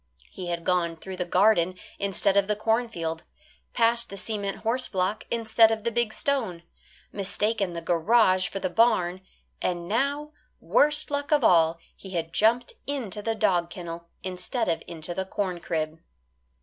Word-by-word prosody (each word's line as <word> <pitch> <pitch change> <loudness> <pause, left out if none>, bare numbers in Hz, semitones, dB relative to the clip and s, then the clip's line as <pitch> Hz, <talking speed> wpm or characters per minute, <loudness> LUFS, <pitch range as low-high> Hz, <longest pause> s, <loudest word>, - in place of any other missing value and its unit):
He 180 - -7
had 170 -1 -3
gone 170 -2 +1
through 190 +3 -8
the 180 - -1
garden 185 -1 +3 0.2
instead 195 0 +1
of 200 -1 +3
the 210 - +1
cornfield, 215 -7 -1 0.5
past 235 0 +2
the 200 - -7
cement 200 -1 -3
horse 250 +3 +1
block 190 +3 -1
instead 225 -1 +4
of 220 -1 -2
the 235 - 0
big 235 -1 +1
stone, 220 -12 -2 0.5
mistaken 200 -1 -1
the 170 0 -5
garage 185 +3 +3
for - - -6
the 190 - -1
barn, 190 -5 +2 0.4
and 175 -1 -2
now, 280 +7 0 0.3
worst 300 +1 +2
luck 285 +1 -2
of 295 -3 +4
all, 165 -4 +5 0.2
he 190 -2 -9
had 165 -1 -2
jumped 235 +3 +2
into 235 -8 -3
the 225 +1 -1
dog 175 -5 +2
kennel 170 -2 -8
instead 185 +6 -2
of 165 - 0
into 165 +1 -5
the 190 - -2
corn 185 -2 -3
crib. 160 -2 -3
195 Hz, 160 wpm, -26 LUFS, 175-230 Hz, 0.5 s, all